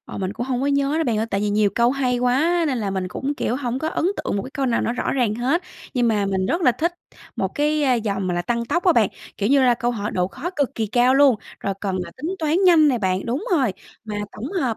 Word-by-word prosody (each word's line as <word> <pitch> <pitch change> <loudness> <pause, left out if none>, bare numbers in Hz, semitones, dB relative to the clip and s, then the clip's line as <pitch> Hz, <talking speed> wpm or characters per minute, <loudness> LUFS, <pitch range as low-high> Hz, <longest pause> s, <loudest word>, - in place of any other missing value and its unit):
Ờ, - - -7
mình 190 0 -2
cũng 240 - -4
không 250 -2 -1
có 275 - 0
nhớ 280 +2 +1
đó, 325 - +1
bạn 225 -5 0
ơi. 220 - 0
Tại 195 - 0
vì 210 - 0
nhiều 205 -1 +2
câu 235 +1 +3
hay 255 -2 0
quá 310 +8 +2
nên 260 -5 0
là 200 -3 -2
mình 190 -1 -2
cũng, 280 +8 -3
kiểu, 250 - -1
hổng 255 -2 -2
có 315 - -2
ấn 320 - -2
tượng - - -2
một 195 - -1
cái - - -8
câu 275 -1 -2
nào 235 -2 +1
nó 230 - -1
rõ - - -2
ràng 240 -6 +1
hết. 270 +10 0 0.3
Nhưng 245 -2 +2
mà 205 -2 +1
mình 190 -1 0
rất 335 - 0
là 250 - +5
thích 330 +9 -1 0.4
một - - 0
cái 300 0 +1 0.2
vòng 200 -3 -1
mà 180 - -1
là 175 - -1
Tăng 235 +3 -1
tốc 345 +9 -1
á 355 - +6
bạn, 220 -7 +3 0.3
kiểu 205 +1 0
như 275 -1 +4
là 245 -2 +5
câu 240 +1 -1
hỏi 210 -3 -3
độ 180 0 0
khó 290 - -5
cực 285 -3 0
kỳ 220 -1 -1
cao 245 +4 +3
luôn, 275 -4 +5 0.2
rồi 195 -1 -2
cần 195 -2 -2
là 170 - -10
tính 345 +5 -3
toán 315 +1 +1
nhanh 320 -4 +6
nè 250 -4 +1
bạn. 190 -2 -1
Đúng 255 - -2
rồi, 265 - +2 0.3
mà 215 -1 -5 0.2
tổng 260 - -6
hợp 260 - -1
245 Hz, 290 wpm, -22 LUFS, 210-285 Hz, 0.4 s, á